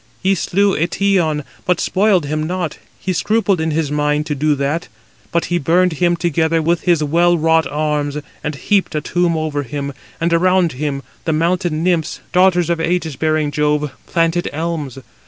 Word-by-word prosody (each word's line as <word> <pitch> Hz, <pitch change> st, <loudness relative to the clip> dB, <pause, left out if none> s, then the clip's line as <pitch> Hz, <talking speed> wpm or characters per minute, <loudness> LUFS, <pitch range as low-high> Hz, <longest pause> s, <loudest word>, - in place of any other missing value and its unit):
He 190 Hz, +1 st, +3 dB
slew 195 Hz, +2 st, +1 dB
Eetion, 170 Hz, -2 st, +1 dB, 0.2 s
but 180 Hz, -1 st, +1 dB
spoiled 195 Hz, -4 st, +2 dB
him 155 Hz, +2 st, -2 dB
not, 175 Hz, -3 st, -3 dB, 0.2 s
he 185 Hz, -, -2 dB
scrupled 205 Hz, -2 st, +1 dB
in 160 Hz, -, 0 dB
his 155 Hz, -2 st, -1 dB
mind 150 Hz, 0 st, 0 dB
[to 155 Hz, -, -2 dB
do] 150 Hz, +1 st, +1 dB
that; 145 Hz, +5 st, -2 dB, 0.4 s
but 170 Hz, -, +1 dB
he 175 Hz, -, +2 dB
burned 175 Hz, +4 st, +2 dB
him 175 Hz, +2 st, +2 dB
together 165 Hz, -1 st, +1 dB
with 165 Hz, +2 st, +1 dB
his 170 Hz, -4 st, +3 dB
well 170 Hz, +4 st, +3 dB
wrought 160 Hz, 0 st, +3 dB
arms, 150 Hz, -1 st, -1 dB, 0.3 s
and 150 Hz, 0 st, -3 dB
heaped 195 Hz, +5 st, 0 dB
a 150 Hz, -, 0 dB
tomb 175 Hz, +1 st, 0 dB
over 155 Hz, -2 st, -1 dB
him, 140 Hz, +1 st, -5 dB, 0.3 s
and 170 Hz, +1 st, +1 dB
around 180 Hz, 0 st, +3 dB
[him] 140 Hz, 0 st, -3 dB, 0.2 s
the 160 Hz, -, +1 dB
mountain 170 Hz, 0 st, 0 dB
nymphs, 170 Hz, -4 st, 0 dB
daughters 180 Hz, -2 st, +3 dB
of 170 Hz, -, 0 dB
ægis 165 Hz, -3 st, -1 dB
bearing 155 Hz, -2 st, +1 dB
Jove, 150 Hz, -1 st, 0 dB, 0.2 s
planted 165 Hz, +1 st, +1 dB
elms. 155 Hz, -4 st, -3 dB
165 Hz, 175 wpm, -18 LUFS, 150-175 Hz, 0.4 s, He